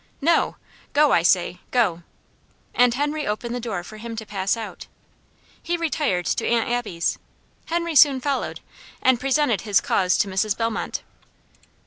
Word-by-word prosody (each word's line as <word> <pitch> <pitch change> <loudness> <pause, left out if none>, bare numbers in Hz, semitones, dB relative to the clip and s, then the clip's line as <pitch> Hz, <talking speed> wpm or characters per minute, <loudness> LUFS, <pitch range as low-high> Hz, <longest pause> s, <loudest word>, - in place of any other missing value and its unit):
"No! 330 +3 +2 0.4
Go, 295 0 +4
I - - +4
say! 180 +1 +2
go!" 205 -9 +1 0.7
and 245 -1 +4
Henry 295 +2 -1
opened 225 +3 -3
the 245 - -2
door 220 -7 -4
for 215 +4 -11
him 230 +1 -7
to 220 0 -6
pass 200 +1 -1
out. 225 -2 -7 0.7
He 345 +1 -1
retired 295 - -1
to - - 0
Aunt 235 -1 +2
Abby's. 235 -8 -1 0.5
Henry 335 0 -1
soon 280 -2 +7
followed, 275 +1 -2 0.4
and 260 -2 +4
presented 270 -4 +1
his 205 -3 +3
cause 185 -2 +1
to - - +2
Mrs. 195 +2 0
Bellmont. 225 -1 -2
235 Hz, 150 wpm, -23 LUFS, 200-285 Hz, 0.7 s, soon